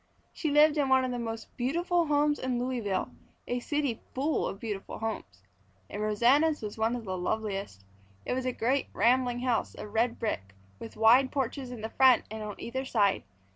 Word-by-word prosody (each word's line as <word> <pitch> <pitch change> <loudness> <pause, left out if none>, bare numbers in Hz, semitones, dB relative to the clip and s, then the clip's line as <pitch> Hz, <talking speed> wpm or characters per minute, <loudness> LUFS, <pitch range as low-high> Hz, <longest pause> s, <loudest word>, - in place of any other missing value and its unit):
She 310 - -2
lived 300 +1 +5
in 275 -2 +1
one 260 0 +4
of 255 - -2
the 245 - -3
most 225 -1 -6
beautiful 340 +6 +1
homes 295 0 +2
in 255 -1 -1
Louisville, 240 -6 -2 0.4
a 245 - -1
city 285 -3 -2
full 285 +4 0
of 195 - -6
beautiful 210 -4 -5
homes. 100 - -5 0.5
And 205 - -4
Rosanna's 245 +8 +3
was 210 - -5
one 225 +2 0
of 235 -2 -6
the 185 -1 -3
loveliest. 195 - -3 0.4
It - - -1
was 255 0 -2
a - - +1
great, 255 +3 0
rambling 245 +2 +2
house 250 -2 0
of 210 - -9
red 230 +1 +1
brick 95 - -3 0.2
with 225 - -9
wide 245 +4 +5
porches 270 -1 -2
in 245 -3 -7
the 220 - -4
front 260 -1 +5
and 220 0 -5
on 210 -1 -5
either 260 +3 -4
side. 210 -7 +2
245 Hz, 190 wpm, -29 LUFS, 220-265 Hz, 0.5 s, lived